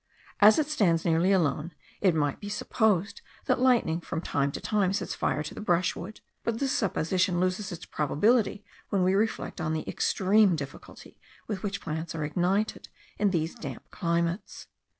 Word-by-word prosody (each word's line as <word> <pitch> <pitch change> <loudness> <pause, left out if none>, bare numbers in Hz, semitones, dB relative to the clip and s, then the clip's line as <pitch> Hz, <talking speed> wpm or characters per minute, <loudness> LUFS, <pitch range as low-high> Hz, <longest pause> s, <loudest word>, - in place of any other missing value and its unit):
As 210 +1 +7
it 310 - +2
stands 195 - +1
nearly 170 +3 +3
alone, 160 -3 +1 0.3
it 185 -5 +3
might 145 -3 0
be 205 - -7
supposed 210 - 0 0.2
that - - +2
lightning 240 -10 +3
from 165 - -4
time 140 -4 -1
to - - -4
time 200 -3 +1
sets - - -2
fire 150 - -1
to 155 - -7
the - - -7
brushwood; 180 +1 -1 0.2
but 230 -1 -1
this 270 +1 0
supposition 185 -2 +1
loses 185 +2 -1
its 170 -1 -7
probability 205 - +1 0.2
when 195 -2 +1
we 185 +1 +3
reflect 205 -3 -1
on 160 0 -1
the 155 - -3
extreme 195 -1 +3
difficulty 140 -2 -9 0.3
with 200 -4 -3
which 200 -1 -3
plants 160 +1 -4
are 155 - -2
ignited 185 +7 -1 0.3
in 205 0 +3
these 165 -3 -1
damp 235 - -8
climates. 170 +1 -2
185 Hz, 170 wpm, -28 LUFS, 165-210 Hz, 0.3 s, As